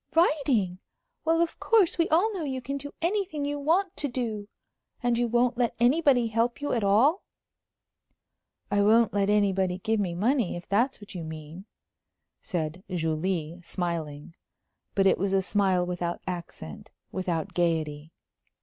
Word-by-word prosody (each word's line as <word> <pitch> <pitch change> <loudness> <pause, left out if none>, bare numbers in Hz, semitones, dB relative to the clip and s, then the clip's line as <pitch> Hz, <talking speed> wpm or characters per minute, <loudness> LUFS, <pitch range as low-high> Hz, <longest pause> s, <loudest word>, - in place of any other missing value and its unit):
"Writing! 270 - +2 0.5
Well, 330 +1 +3
of 340 - -1
course, 400 -6 +3
we 335 - +2
all 390 +8 +3
know 365 -5 -3
you 265 -3 -3
can 275 +3 -4
do 285 +1 -7
anything 360 -5 -1
you 290 0 -2
want 350 +6 +1
to 290 - 0
do. 230 -5 -3 0.6
And 240 -1 +2
you 240 0 +1
won't 240 +1 +1
let 240 -2 +1
anybody 255 0 +4
help 230 +2 0
you 290 - -2
at 230 -4 0
all?" 240 - +4 1.5
"I 205 0 +3
won't 225 +3 +4
let 200 0 +1
anybody 195 -3 +2
give 220 +3 0
me 180 -4 -1
money, 230 +2 +1
if 175 - -8
that's 235 +7 +1
what 205 - -11
you 175 -3 -5
mean," 160 +3 -8 0.8
said 170 0 -3
Julie, 165 0 -2
smiling. 165 -4 -4 0.6
But 195 - +3
it 195 - +4
was 195 +1 0
a 195 - +3
smile 190 -3 +2
without 175 -1 -3
accent, 170 - -7 0.2
without 175 -4 -2
gayety. 160 -3 -1
205 Hz, 155 wpm, -27 LUFS, 175-275 Hz, 1.5 s, anybody